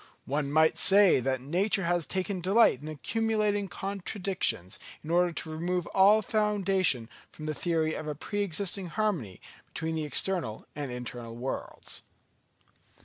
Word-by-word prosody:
One 140 +1 -1
might 160 +1 +4
say 195 0 +6
that 130 0 -1
nature 190 +8 0
has 175 -1 0
taken 185 0 -2
delight 190 - +4
in 150 - -8
accumulating 210 +5 0
contradictions 190 - -2 0.2
in 160 - -5
order 175 +1 +3
to 160 - -5
remove 175 +2 -1
all 205 +3 +6
foundation 195 - +2 0.2
from 155 - -9
the 155 - -1
theory 160 -1 0
of 155 - -5
a 150 - -3
pre 205 +7 -3
existing 195 0 0
harmony 170 - -2 0.3
between 160 0 -4
the 160 -1 -2
external 150 - 0
and 145 -3 -4
internal 120 -1 -6
worlds." 125 +3 -4
175 Hz, 145 wpm, -29 LUFS, 150-195 Hz, 0.3 s, say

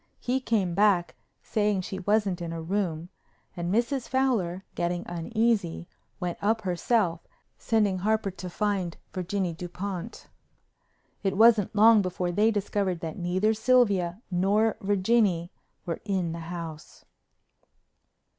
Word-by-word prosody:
He 255 +2 0
came 210 -8 0
back 195 -2 +3 0.3
saying 205 -3 0
she 190 +1 -6
wasn't 200 -2 +1
in 170 - -4
her 165 0 -5
room, 175 -2 -2 0.5
and 175 0 -3
Mrs. 240 +4 0
Fowler, 220 -9 0
getting 175 +1 -2
uneasy, 190 -1 -1 0.3
went 180 -2 -3
up 220 +2 +1
herself, 180 -2 0 0.3
sending 210 -4 +1
Harper 215 +1 0
to 180 0 -7
find 190 -3 -1 0.2
Virginie 185 -1 -2
Dupont. 180 +4 -6 0.9
It 195 -1 -1
wasn't 220 -3 +5
long 220 +1 +7
before 180 -1 -2
they 210 +5 +3
discovered 200 -4 -1
that 160 +1 -5
neither 185 +5 +1
Sylvia 220 -5 +2
nor 200 +5 +2
Virginie 195 -3 +2 0.3
were 170 - -3
in 190 -5 -1
the 165 - -5
house. 165 -3 -8
195 Hz, 125 wpm, -27 LUFS, 175-215 Hz, 0.9 s, long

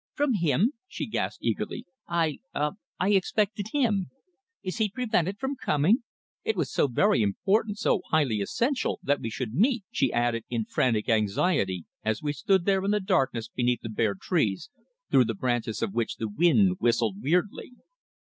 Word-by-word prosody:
"From 290 -3 +1
him?" 190 - +2
she - - -4
gasped - - -3
eagerly. - - -2 0.2
"I 165 -4 0 0.2
ah! 150 +1 +1 0.3
I 185 - +2
expected 205 +1 +1
him. 220 -10 +1 0.5
Is 185 +4 -4
he 215 -1 +2
prevented 205 -5 0
from 270 +4 -3
coming? 175 - +2 0.4
It 445 0 0
was - - -1
so - - +2
very 120 -1 +3
important, 200 - +1
so 205 - +1
highly 135 -10 +2
essential, 245 - -1
that 145 +1 +1
we 115 - -3
should 115 0 -4
meet," 235 - +2
she 135 - +1
added 120 -1 0
in 115 -3 -1
frantic 115 -3 0
anxiety 100 - +1 0.2
as 110 +3 -1
we 145 -1 -1
stood 185 +5 +1
there 195 -1 +2
in 195 - 0
the 210 0 +2
darkness 135 - 0
beneath 120 0 0
the 115 - -4
bare 110 -2 0
trees, 110 - -1 0.4
through 130 - +6
the 115 - -2
branches 120 -1 -1
of 95 - -2
which 115 0 -1
the 110 - -3
wind 175 - +3
whistled 115 -4 +1
weirdly. 180 - 0
155 Hz, 170 wpm, -27 LUFS, -, 0.5 s, through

